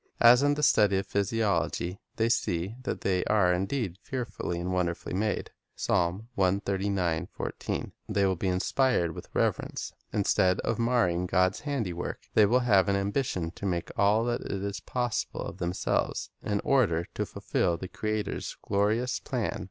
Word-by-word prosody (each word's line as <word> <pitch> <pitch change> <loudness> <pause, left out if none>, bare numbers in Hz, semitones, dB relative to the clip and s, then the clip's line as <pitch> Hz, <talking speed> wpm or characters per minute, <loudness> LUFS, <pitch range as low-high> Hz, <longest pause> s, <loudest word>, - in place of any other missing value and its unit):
As 120 +2 +8
in 145 0 +3
the 150 - -3
study 105 -7 +5
of 95 - -1
physiology 100 -3 0 0.2
they 115 - +2
see 95 -3 0
that - - -2
they 90 -2 +1
are 95 -4 +3
indeed 95 0 -2
"fearfully 120 -9 -4
and 90 +1 -2
wonderfully 90 -2 -1
made," 105 +3 -1 0.3
2 90 +4 +1 1.9
they 100 -1 +2
will 95 -1 +2
be 95 - -2
inspired 90 -1 +1
with - - -9
reverence. - - -1 0.2
Instead 95 -3 +2
of 115 - -1
marring 95 -8 +2
God's 90 +1 +2
handiwork, 115 - -3
they 105 -2 +6
will 125 +4 +3
have 100 -5 +4
an 100 - +3
ambition 100 -4 -1
to 100 - -5
make 85 -2 -2
all 105 +3 +3
that 120 0 -1
is 100 +1 -3
possible 120 -3 -2
of - - -7
themselves, 90 +1 -1
in 105 -1 -1
order 100 -12 +2
to - - -1
fulfil 85 - -1
the 95 - -6
Creator's 110 +2 -3
glorious 110 +5 +1
plan. - - -2
100 Hz, 150 wpm, -28 LUFS, 90-115 Hz, 1.9 s, As